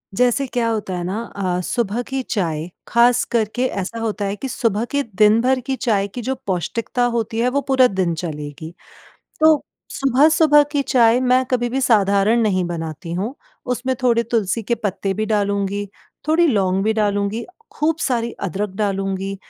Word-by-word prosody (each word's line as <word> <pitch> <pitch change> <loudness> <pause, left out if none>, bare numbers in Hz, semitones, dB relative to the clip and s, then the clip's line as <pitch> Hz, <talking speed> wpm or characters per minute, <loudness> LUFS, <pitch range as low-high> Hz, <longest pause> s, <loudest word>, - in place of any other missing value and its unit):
जैसे 250 +3 +2
क्या 240 -2 -1
होता 210 -4 -2
है 175 - -3
ना 190 +4 -3 0.2
अ, 185 -2 -1
सुबह 235 +3 -1
की 265 +1 -3
चाय, 165 -6 -2 0.2
ख़ास 235 +1 +4
करके 235 +2 0
ऐसा 205 +3 -4
होता 215 -2 -2
है 200 +1 -2
कि 270 - -5
सुबह 230 -2 0
के 285 0 +1
दिन-भर 225 +4 +3
की 270 -1 -1
चाय 205 -6 0
की 240 +5 -7
जो 265 +3 -2
पौष्टिकता 220 +7 -1
होती 225 0 -2
है 245 +2 +2
वो 280 +2 0
पूरा 260 -2 +5
दिन 185 -4 -1
चलेगी। 155 0 -6 0.7
तो 315 -2 +5 0.3
सुबह-सुबह 295 +3 +4
की 285 -2 +1
चाय 245 -2 +4
मैं 255 0 +3
कभी 245 -1 +1
भी 265 +3 -1
साधारण 210 -1 +3
नहीं 185 -4 +1
बनाती 165 0 -5
हूँ, 205 +9 -3 0.3
उसमें 250 +1 -1
थोड़े 235 -2 +3
तुलसी 225 -1 -1
के 235 +3 0
पत्ते 200 -3 -2
भी 215 0 -2
डालूँगी, 200 -1 -1 0.4
थोड़ी 330 +2 +4
लौंग 195 -6 +1
भी 220 - +2
डालूँगी, 205 +1 -1 0.3
खूब 310 +1 0
सारी 235 -4 -1
अदरक 200 +2 -3
डालूँगी 195 -1 -2
220 Hz, 170 wpm, -20 LUFS, 195-250 Hz, 0.7 s, पूरा